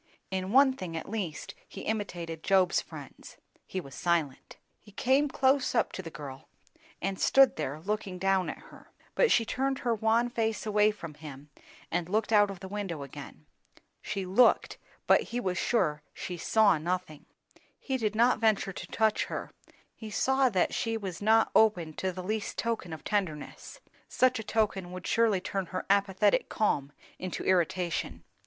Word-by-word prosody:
In 190 0 -2
one 265 +2 +6
thing 180 -9 -6
at 160 - -6
least 195 -9 -4
he - - -9
imitated 175 -7 -4
Job's 190 -1 +3
friends; - - -12 0.3
he 190 - -3
was 140 -7 -10
silent. 165 -6 -1 0.2
He 210 - -18
came 265 +7 +2
close 265 -1 +2
up - - +2
to - - -5
the 170 - -8
girl 135 -3 -9 0.5
and 195 0 -2
stood 270 -1 +5
there, 150 -1 -4
looking 200 +1 -3
down 190 0 +1
at - - -5
her. - - -16 0.2
But - - +3
she 230 - +4
turned 270 +3 -1
her 235 - +3
wan 225 +2 +2
face 220 -3 -1
away 210 0 +3
from 170 -7 -7
him 145 -1 -11 0.4
and 175 0 -1
looked 215 +2 0
out 205 -1 +5
of 195 -3 -8
the 190 - -7
window 190 -7 -4
again. 140 - -11 0.6
She 200 -3 -4
looked, 195 +7 +3 0.3
but - - +5
he 240 - -4
was 185 -6 -2
sure 155 -11 +1
she 180 - -5
saw 200 0 +3
nothing. 175 -2 -4 0.5
He 265 -1 -2
did 215 -3 -1
not 235 +1 +4
venture 215 -3 +1
to - - -8
touch 220 -1 +1
her; - - -6 0.4
he 220 - -9
saw 265 +5 +2
that 190 -5 +1
she 225 -1 -1
was 190 -4 -6
not 220 +2 +4
open 180 -8 +3
to 190 - -1
the 185 0 -7
least 215 +2 -3
token 230 -7 -2
of 160 - -7
tenderness; 190 - -3 0.3
such 255 -2 +2
a - - -4
token 200 -5 -1
would 185 0 -7
surely 225 -5 +2
turn 195 -1 -3
her 185 +1 -4
apathetic 200 0 +2
calm 145 -10 0 0.3
into 185 -1 -4
irritation. 180 -1 0
195 Hz, 175 wpm, -29 LUFS, 175-220 Hz, 0.6 s, one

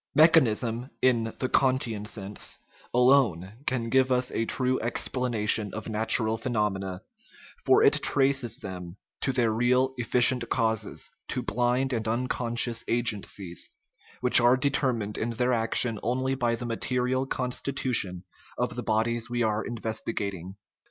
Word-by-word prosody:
Mechanicism 125 -6 +3
(in 120 -3 +3
the 130 - -1
Kantian 130 -6 +1
sense) 100 -1 -4 0.3
alone 120 -8 +3
can 120 -3 -1
give 130 0 +3
us 125 0 +1
a 115 - -1
true 130 +2 -1
explanation 115 -3 0
of 110 +1 -6
natural 110 +1 +2
phenomena, 100 -6 -2 0.6
for - - +4
it - - +4
traces 135 -4 +1
them 90 -5 -8 0.2
to 135 - 0
their 120 -3 +1
real 125 +3 +1
efficient 120 +1 +3
causes, 110 -3 -2 0.2
to - - -3
blind 125 +3 0
and 115 -2 -2
unconscious 120 0 0
agencies, 105 -6 -1 0.5
which 125 0 +7
are 120 +2 +4
determined 125 -6 -1
in 115 - -2
their 125 +2 0
action 115 -1 +1
only 130 +3 -1
by 120 -3 0
the 120 - -7
material 125 +2 -1
constitution 125 -8 -1 0.3
of - - -2
the - - -3
bodies 115 +2 -1
we 120 0 -1
are 110 0 0
investigating. 105 -5 -4
120 Hz, 130 wpm, -26 LUFS, 110-125 Hz, 0.6 s, which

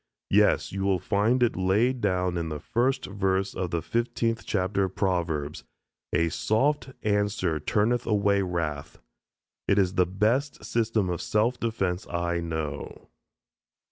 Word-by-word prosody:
"Yes, - - +3
you 95 - -4
will 95 -1 +2
find 110 +7 +1
it 120 - +2
laid 110 +8 +1
down 90 -3 +1
in 85 -1 -2
the 75 -1 -4
first 125 - 0
verse 95 -1 -1
of 90 -1 -3
the 85 -2 -2
fifteenth 115 +1 -1
chapter 95 0 +1
of 95 - -7
Proverbs, 85 -7 -1 0.5
'A 85 0 +2
soft 135 - +1
answer 100 -6 0
turneth 110 +9 +1
away 100 -2 +2
wrath'; 85 -6 -3 0.7
it 100 - +3
is 95 -2 +3
the 90 -1 +3
best 110 +10 0
system 115 -4 0
of 85 - -3
self 115 +4 +1
defense 100 -5 -2
I 85 0 -1
know." 80 -4 -5
95 Hz, 140 wpm, -27 LUFS, 85-110 Hz, 0.7 s, Yes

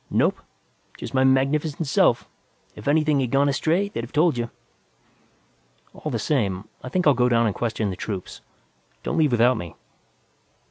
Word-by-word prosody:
"Nope. - - +1 0.6
Just - - -7
my 130 0 +3
magnificent 140 +4 +1
self. 135 - +2 0.5
If 105 - -10
anything 150 0 +3
had 130 -3 0
gone 140 +3 +3
astray, 165 +7 +1
they'd 115 -13 -5
have 120 - -9
told 155 0 +3
you." 120 -1 -3 1.4
"All - - -6
the - - -1
same, 105 -9 -1 0.2
I 130 - -6
think 180 +6 0
I'll 145 - +6
go 125 0 +2
down 115 -1 +3
and 105 - +1
question 110 -3 -2
the - - -5
troops. 95 -1 -6 0.6
Don't 165 - -1
leave 150 -3 +3
without 120 +2 +4
me." 85 -2 -7
130 Hz, 170 wpm, -23 LUFS, 115-150 Hz, 1.4 s, I'll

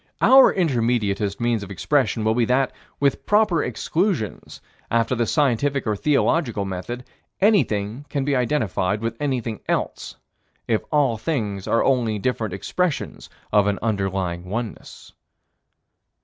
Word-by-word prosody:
Our 265 0 +7
intermediatist 115 - 0
means 120 -2 0
of 100 - -8
expression 125 - 0
will 110 0 +2
be 120 0 +2
that, 130 +3 +1 0.3
with 140 -2 +1
proper 210 -6 +3
exclusions, 155 - -2 0.3
after 115 +1 +1
the 120 -2 0
scientific 140 0 +1
or 110 -2 0
theological 135 - +1
method, 95 +7 -5 0.4
anything 140 - +1
can 140 -2 -2
be 145 -1 +1
identified 110 - 0
with 115 0 -2
anything 125 -7 -2
else, - - -2 0.5
if 110 -2 +1
all 140 -7 +2
things 105 - -3
are 115 - +2
only 120 -5 +1
different 110 -1 -2
expressions 175 - -2 0.2
of 105 -1 +4
an 100 -1 +1
underlying 95 -5 -1
oneness. 115 +2 -6
120 Hz, 130 wpm, -22 LUFS, 105-140 Hz, 0.5 s, Our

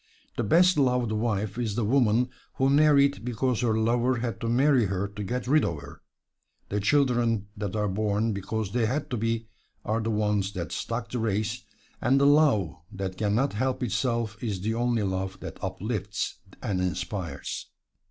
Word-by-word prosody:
The 120 - -1
best 175 - +5
loved 125 -4 +2
wife 105 -1 -1
is 110 -4 -1
the 120 -2 0
woman 120 0 +3 0.2
who 135 +1 +2
married 140 -3 +4
because 125 0 0
her 115 -3 +2
lover 120 +3 +2
had 120 -1 -3
to 115 - -1
marry 130 0 +4
her 100 +1 -1
to 105 +1 -7
get 125 +5 -3
rid 150 +4 +4
of 85 - -1
her; 70 0 -12 0.7
the 105 - 0
children 120 -3 +2
that 100 -2 -4
are 105 -1 +1
born 105 +2 0
because 100 +1 -3
they 115 -2 +1
had 145 +4 -2
to 125 - 0
be 115 +1 -1 0.4
are 110 +1 0
the 110 - -2
ones 105 -2 0
that 85 -4 -4
stock 115 0 -3
the 125 - -2
race; 110 +1 -1 0.4
and 135 +3 +3
the 140 - +4
love 140 - +4
that 95 -2 -4
can 105 +1 0
not 135 +2 +1
help 130 +4 -1
itself 115 -1 -1
is 100 -6 -2
the 110 +3 -1
only 120 -1 +1
love 95 0 -2
that - - -9
uplifts 105 +2 -3 0.2
and 100 -7 -1
inspires. 90 -4 -3
110 Hz, 180 wpm, -27 LUFS, 100-125 Hz, 0.7 s, best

